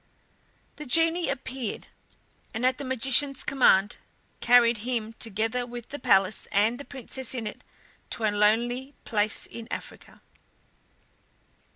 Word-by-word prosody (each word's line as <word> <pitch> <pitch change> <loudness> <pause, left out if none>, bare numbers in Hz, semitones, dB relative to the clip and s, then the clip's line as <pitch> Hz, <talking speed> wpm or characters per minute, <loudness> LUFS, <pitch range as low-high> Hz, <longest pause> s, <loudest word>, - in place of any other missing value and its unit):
The 300 - -8
genie 330 +5 +3
appeared, 260 -3 -4 0.7
and 230 +3 -1
at 255 +1 +2
the - - -4
magician's 265 +2 +2
command 205 -7 +3 0.4
carried 240 -2 +4
him, 225 -1 -3
together 225 +3 -1
with 240 -1 -9
the 290 - -6
palace 195 -3 +2
and 215 +4 +2
the 285 - -8
Princess 260 -1 -4
in 235 -3 -4
it, 210 - -7 0.5
to 230 - -4
a 215 - +2
lonely 240 +6 +1
place 210 -1 +1
in 230 -1 -8
Africa. - - -8
240 Hz, 130 wpm, -26 LUFS, 220-260 Hz, 0.7 s, carried